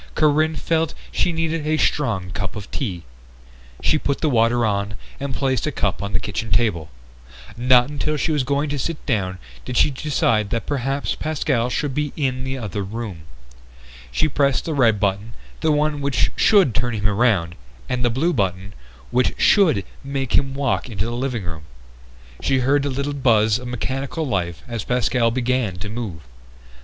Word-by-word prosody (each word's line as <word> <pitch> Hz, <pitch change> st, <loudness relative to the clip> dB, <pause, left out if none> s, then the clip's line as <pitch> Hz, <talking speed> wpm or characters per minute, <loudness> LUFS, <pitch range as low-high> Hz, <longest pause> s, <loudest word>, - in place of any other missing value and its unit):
Corinne 155 Hz, +1 st, +3 dB
felt 160 Hz, +1 st, 0 dB, 0.2 s
she 180 Hz, -, +1 dB
needed 165 Hz, -1 st, -1 dB
a 155 Hz, 0 st, +2 dB
strong 110 Hz, -14 st, 0 dB
cup 90 Hz, +1 st, -4 dB
of 105 Hz, -1 st, -8 dB
tea. 95 Hz, -11 st, -3 dB, 0.8 s
She 155 Hz, -, +3 dB
put 140 Hz, -1 st, -1 dB
the 155 Hz, -, +2 dB
water 120 Hz, 0 st, +3 dB
on 100 Hz, 0 st, -1 dB, 0.2 s
and 140 Hz, 0 st, -3 dB
placed 130 Hz, -3 st, 0 dB
a -, -, 0 dB
cup -, -, -1 dB
on 100 Hz, 0 st, -4 dB
the -, -, +1 dB
kitchen 110 Hz, +1 st, -4 dB
table. 85 Hz, -10 st, +1 dB, 0.7 s
Not 125 Hz, 0 st, +5 dB
until 150 Hz, +1 st, -1 dB
she 160 Hz, -, 0 dB
was 150 Hz, -3 st, +1 dB
going 140 Hz, +3 st, 0 dB
to 145 Hz, -1 st, -2 dB
sit 165 Hz, +4 st, -3 dB
down 95 Hz, -8 st, 0 dB, 0.3 s
did 125 Hz, -1 st, -4 dB
she -, -, +5 dB
decide 120 Hz, -7 st, +1 dB
that 115 Hz, +1 st, -2 dB
perhaps 135 Hz, 0 st, -1 dB
Pascal 140 Hz, -6 st, 0 dB
should 140 Hz, +2 st, -1 dB
be 150 Hz, 0 st, -1 dB
in 130 Hz, -3 st, -1 dB
the 130 Hz, 0 st, -3 dB
other 105 Hz, -4 st, -4 dB
room. 100 Hz, -5 st, -6 dB, 0.9 s
She 155 Hz, -, +1 dB
pressed 140 Hz, -2 st, +1 dB
the 160 Hz, -, -2 dB
red 115 Hz, -7 st, +3 dB
button, 100 Hz, +3 st, -1 dB, 0.3 s
the 160 Hz, -, +2 dB
one 150 Hz, 0 st, +1 dB
which 140 Hz, -1 st, +1 dB
should 195 Hz, -, +5 dB
turn 120 Hz, +2 st, 0 dB
him 105 Hz, 0 st, +1 dB
around, 100 Hz, -5 st, +2 dB, 0.3 s
and 125 Hz, -1 st, -1 dB
the 120 Hz, -, +3 dB
blue 150 Hz, +9 st, +1 dB
button, 95 Hz, -3 st, -1 dB, 0.4 s
which 125 Hz, +1 st, +2 dB
should 160 Hz, -, +4 dB, 0.2 s
make 135 Hz, -2 st, -3 dB
him 135 Hz, -1 st, +2 dB
walk 140 Hz, -2 st, 0 dB
into 100 Hz, -3 st, -2 dB
the 120 Hz, -, -3 dB
living 120 Hz, -3 st, -2 dB
room. 80 Hz, -4 st, -6 dB, 0.8 s
She 135 Hz, -1 st, +2 dB
heard 140 Hz, +3 st, +3 dB
the 140 Hz, -, -1 dB
little 140 Hz, +2 st, -2 dB
buzz 110 Hz, -5 st, +3 dB
of 125 Hz, -, -7 dB
mechanical 135 Hz, +6 st, -3 dB
life 90 Hz, -, -2 dB
as 115 Hz, -4 st, -4 dB
Pascal 125 Hz, -1 st, +2 dB
began 125 Hz, -4 st, 0 dB
to 90 Hz, +3 st, -6 dB
move. 105 Hz, -8 st, -5 dB
125 Hz, 180 wpm, -22 LUFS, 105-145 Hz, 0.9 s, Not